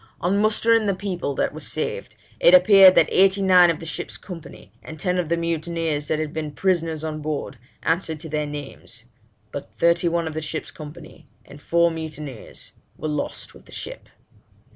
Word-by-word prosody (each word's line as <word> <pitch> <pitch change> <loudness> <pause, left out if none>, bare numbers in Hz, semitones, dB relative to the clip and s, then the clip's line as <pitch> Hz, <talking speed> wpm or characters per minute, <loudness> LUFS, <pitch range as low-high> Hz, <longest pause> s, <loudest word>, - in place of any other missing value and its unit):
On 185 +4 +1
mustering 220 +1 +3
the 200 - +1
people 180 -7 -3
that - - 0
were - - -7
saved, - - -3 0.2
it 175 - +7
appeared 190 0 +8
that - - +5
eighty 195 +1 +4
nine 180 -2 +6
of 165 - -1
the 165 - -8
ship's 165 - -5
company, 165 - -11
and 155 0 -10
ten 180 +3 0
of 170 -3 -2
the 170 - +1
mutineers 165 -2 -2
that 155 - 0
had 155 -1 -3
been 155 -2 -4
prisoners 165 -3 0
on 155 -1 -4
board, 145 -4 -4 0.2
answered 165 -2 -1
to 165 - -6
their 150 0 -2
names; 145 -5 -8 0.5
but 145 - -7
thirty 170 +1 +3
one 170 -1 0
of 160 - -5
the 160 - -3
ship's 155 +1 -5
company, 155 +1 -12 0.2
and 145 - -14
four 170 +2 +2
mutineers, 155 -6 -8 0.3
were - - -4
lost 150 -1 -4
with - - -17
the - - -18
ship.' - - -8
165 Hz, 185 wpm, -23 LUFS, 150-180 Hz, 0.5 s, appeared